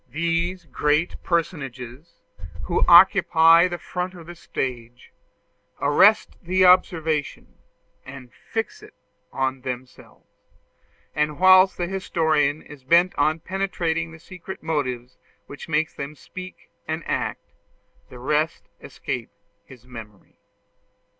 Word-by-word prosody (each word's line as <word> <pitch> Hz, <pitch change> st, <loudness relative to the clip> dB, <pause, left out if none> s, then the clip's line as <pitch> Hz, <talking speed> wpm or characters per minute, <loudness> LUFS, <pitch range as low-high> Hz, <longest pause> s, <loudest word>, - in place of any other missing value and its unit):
These 170 Hz, +3 st, -2 dB
great 150 Hz, +2 st, -1 dB
personages, 140 Hz, -4 st, -4 dB, 0.5 s
who -, -, 0 dB
occupy 165 Hz, +2 st, +6 dB
the 175 Hz, -1 st, -5 dB
front 180 Hz, +1 st, -5 dB
of 170 Hz, -2 st, -12 dB
the 175 Hz, -, -9 dB
stage, 125 Hz, -7 st, -6 dB, 0.7 s
arrest -, -, +3 dB
the 185 Hz, +2 st, +2 dB
observation, 160 Hz, -5 st, +1 dB, 0.4 s
and 130 Hz, -2 st, -12 dB
fix 225 Hz, -, -5 dB
it 425 Hz, 0 st, -16 dB, 0.4 s
on 130 Hz, 0 st, -2 dB
themselves; 125 Hz, 0 st, -9 dB, 0.9 s
and 150 Hz, -1 st, -1 dB
whilst 185 Hz, +1 st, +6 dB
the 175 Hz, -, -1 dB
historian 160 Hz, -6 st, 0 dB
is 145 Hz, -3 st, -14 dB
bent 170 Hz, +6 st, +3 dB
on 155 Hz, +3 st, +1 dB
penetrating 170 Hz, -4 st, -2 dB
the 160 Hz, -, -12 dB
secret 180 Hz, +3 st, -10 dB
motives 130 Hz, -6 st, -3 dB, 0.3 s
which 145 Hz, +3 st, -11 dB
make 160 Hz, 0 st, 0 dB
them 140 Hz, +2 st, -7 dB
speak 185 Hz, +5 st, -11 dB, 0.2 s
and 160 Hz, +1 st, -3 dB
act, -, -, -4 dB, 0.6 s
the 125 Hz, -, -12 dB
rest 150 Hz, +6 st, -2 dB
escape -, -, -6 dB, 0.4 s
his 125 Hz, -2 st, -16 dB
memory. 110 Hz, -5 st, -13 dB
160 Hz, 115 wpm, -23 LUFS, 135-175 Hz, 0.9 s, occupy